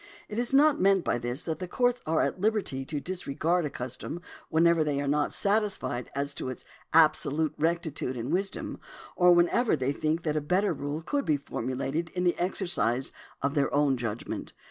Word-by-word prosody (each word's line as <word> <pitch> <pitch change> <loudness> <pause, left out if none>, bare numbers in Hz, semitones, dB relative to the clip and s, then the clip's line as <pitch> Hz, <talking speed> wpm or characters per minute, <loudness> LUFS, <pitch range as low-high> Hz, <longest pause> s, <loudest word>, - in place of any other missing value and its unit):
It 215 - -4
is 240 - 0
not 290 -1 +5
meant 195 -1 +4
by - - 0
this 120 +4 -3
that 160 -2 -3
the 180 - -4
courts 245 +5 +1
are 160 0 +2
at 185 - -2
liberty 205 -11 0
to 150 +1 -3
disregard 175 0 -1
a - - -2
custom 130 +6 -5 0.3
whenever 165 0 +4
they 145 -2 -1
are 140 - -2
not 145 +1 +1
satisfied 200 - 0
as 140 +1 -2
to 130 - -4
its 130 - -8 0.3
absolute 155 -1 +3
rectitude 160 -5 -1
and 120 +6 -3
wisdom, 195 +2 -2 0.4
or 180 -1 +6
whenever 175 +7 +3
they 130 -1 0
think 155 +3 -1
that 155 -2 -1
a 155 - +1
better 180 +6 +1
rule 145 +2 -4
could 285 - -1
be 150 - +2
formulated 135 +5 -3
in 180 - 0
the 175 -1 +3
exercise 175 - 0 0.3
of 140 0 +1
their 145 -2 +1
own 145 -1 +3
judgment. 115 -2 -5
155 Hz, 190 wpm, -28 LUFS, 140-180 Hz, 0.4 s, or